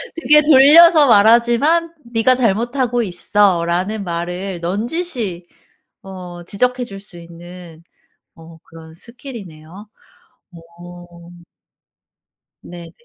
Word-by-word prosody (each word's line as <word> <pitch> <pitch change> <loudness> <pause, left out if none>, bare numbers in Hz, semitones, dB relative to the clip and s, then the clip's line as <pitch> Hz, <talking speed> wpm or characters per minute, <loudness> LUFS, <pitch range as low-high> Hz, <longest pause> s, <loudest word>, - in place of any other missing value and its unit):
되게 300 -2 +3
돌려서 305 +2 +5
말하지만 240 +10 +2 0.2
"네가 225 +3 +2
잘못하고 240 +2 -1
있어."라는 185 +1 -1
말을 175 +2 -6
넌지시 215 - -4 0.6
어 180 -2 -11
지적해 250 +7 -2
줄 195 -4 -10
수 195 -3 -13
있는 170 0 -14 0.5
어 165 0 -16
그런 160 -1 -16
스킬이네요. 200 - -13 0.6
어. 175 0 -16 1.3
네네. 170 -1 -12
195 Hz, 200 characters per minute, -16 LUFS, 175-245 Hz, 1.3 s, 돌려서